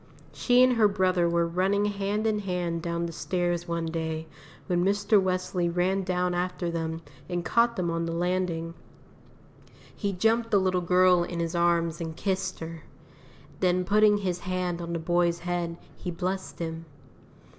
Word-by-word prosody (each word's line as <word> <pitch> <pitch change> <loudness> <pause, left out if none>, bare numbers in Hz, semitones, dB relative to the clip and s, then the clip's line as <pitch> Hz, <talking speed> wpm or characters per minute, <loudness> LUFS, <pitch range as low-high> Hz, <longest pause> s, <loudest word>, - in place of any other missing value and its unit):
She 250 0 +4
and 255 -2 +4
her 215 -2 +6
brother 185 -3 +2
were 170 0 +2
running 190 +4 +1
hand 205 +1 -1
in 215 -1 +1
hand 180 -4 -2
down 170 0 -2
the 170 - -4
stairs 175 0 -1
one 170 -1 -2
day, 160 -1 -3 0.4
when 175 -2 +1
Mr. 205 +1 +3
Wesley 185 -1 -1
ran 180 +3 +1
down 180 -1 0
after 180 -1 -2
them 165 0 -3 0.3
and 175 -1 -2
caught 235 +6 +3
them 175 -4 -1
on 165 0 -1
the - - -2
landing. 170 -1 -1 1.2
He 200 - -2
jumped 225 +5 +1
the 205 - +4
little 185 -1 +1
girl 180 0 +4
in 175 0 -5
his 170 0 -2
arms 170 -1 +1
and 160 -1 -4
kissed 190 -2 -2
her; 165 0 -6 0.8
then 180 0 +2
putting 210 +1 +4
his 185 -3 -2
hand 180 -1 -2
on 170 0 -4
the - - 0
boy's 170 +1 +1
head, 175 -1 -3 0.2
he 180 - -6
blessed 185 +2 -3
him. 165 -1 -5
180 Hz, 165 wpm, -27 LUFS, 170-190 Hz, 1.2 s, her